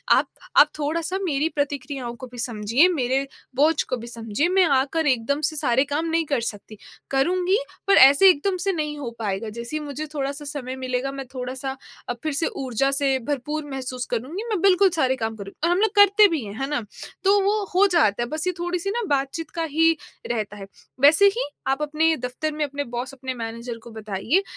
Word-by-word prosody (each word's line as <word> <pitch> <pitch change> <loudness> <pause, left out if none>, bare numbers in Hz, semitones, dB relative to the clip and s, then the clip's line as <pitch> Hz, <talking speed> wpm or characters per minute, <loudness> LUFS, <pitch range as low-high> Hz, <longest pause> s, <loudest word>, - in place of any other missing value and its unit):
आप - - +2 0.3
आप 295 - +8
थोड़ा-सा 325 +5 -1
मेरी 310 -2 0
प्रतिक्रियाओं 280 -3 -3
को 255 +2 -9
भी 245 0 -13
समझिए, 235 - +2
मेरे 270 -4 0 0.3
बोझ 300 +3 +3
को 255 - -3
भी 235 0 -9
समझिए 230 +5 -2
मैं 370 0 +4
आकर 295 +4 -1
एकदम 265 +3 +1
से 310 - -9
सारे 265 -4 +2
काम 310 +3 0
नहीं 330 0 +1
कर 280 -5 0
सकती, 210 +1 -14 0.3
करूँगी 360 +8 +2 0.3
पर 395 - +6
ऐसे 280 +9 +8
एकदम 370 +3 +1
से - - +4
नहीं 300 -4 -3
हो 275 -5 -4
पाएगा। 215 0 -2
जैसे 235 +6 -6
ही - - -3
मुझे 290 +2 -5
थोड़ा-सा 285 0 -3
समय 275 -3 -5
मिलेगा 260 +1 -2
मैं 275 -1 -6
थोड़ा-सा 260 +1 -4 0.3
अ, - - +1
फ़िर 290 +6 -4
से 300 +4 +1
ऊर्जा 270 +1 -1
से 275 -1 +2
भरपूर 295 +2 -2
महसूस 255 -2 -4
करूँगी, 275 - -3
मैं 405 -6 -1
बिल्कुल 390 0 +5
सारे 260 -1 +2
काम 225 -3 -3
करूँगी 200 -1 -9
और 340 - +3
हम 350 - +2
लोग 440 -2 +3
करते 405 +1 +7
भी 325 -8 -2
हैं। 200 -1 -7
है 270 - -1
ना? 295 - 0 0.4
तो 400 +1 +5
वो 410 +2 +1
हो 385 +3 +5
जाता 240 - +3
है - - -4
बस 310 +3 -3
ये 365 - +1
थोड़ी-सी 350 +2 -2
ना 475 +3 -1
बातचीत 285 +3 -1
का 330 - -1
ही 325 +1 +3 0.4
रहता 210 -3 -3
है। 195 - -8 0.4
वैसे 305 +7 +7
ही - - 0 0.2
आप 270 +2 0
अपने 310 +2 +2
दफ़्तर 250 +5 -3
में 305 0 -1
अपने 285 0 -4
बॉस 250 +3 -4
अपने 260 -1 -5
मैनेजर 230 0 -6
को 235 - -11
बताइए 220 - -1
280 Hz, 210 wpm, -23 LUFS, 250-325 Hz, 0.4 s, आप